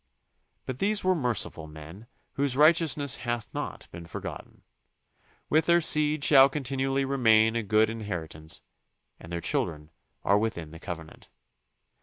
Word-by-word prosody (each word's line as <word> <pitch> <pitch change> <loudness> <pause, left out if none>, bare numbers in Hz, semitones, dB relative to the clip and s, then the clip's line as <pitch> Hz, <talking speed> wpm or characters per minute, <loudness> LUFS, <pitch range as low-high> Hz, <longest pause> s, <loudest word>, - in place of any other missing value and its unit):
But 130 -1 -6
these 210 +1 +1
were 185 0 +3
merciful 120 - -2
men 80 +8 -12 0.3
whose 140 -2 +1
righteousness 150 -3 +3
hath 120 -2 -4
not - - -6
been 85 0 -10
forgotten. - - -8 0.8
With 155 +2 +2
their 170 0 +5
seed 150 -2 +2
shall 135 -2 +7
continually 135 -1 -1
remain 115 -4 +3
a 115 - 0
good 110 +1 +3
inheritance 85 -8 -4 0.6
and 85 - -12
their 85 0 -3
children 75 -1 -2 0.3
are 100 +2 +3
within 85 -8 -3
the 80 - -11
covenant. 80 -3 -9
115 Hz, 135 wpm, -27 LUFS, 85-140 Hz, 0.8 s, shall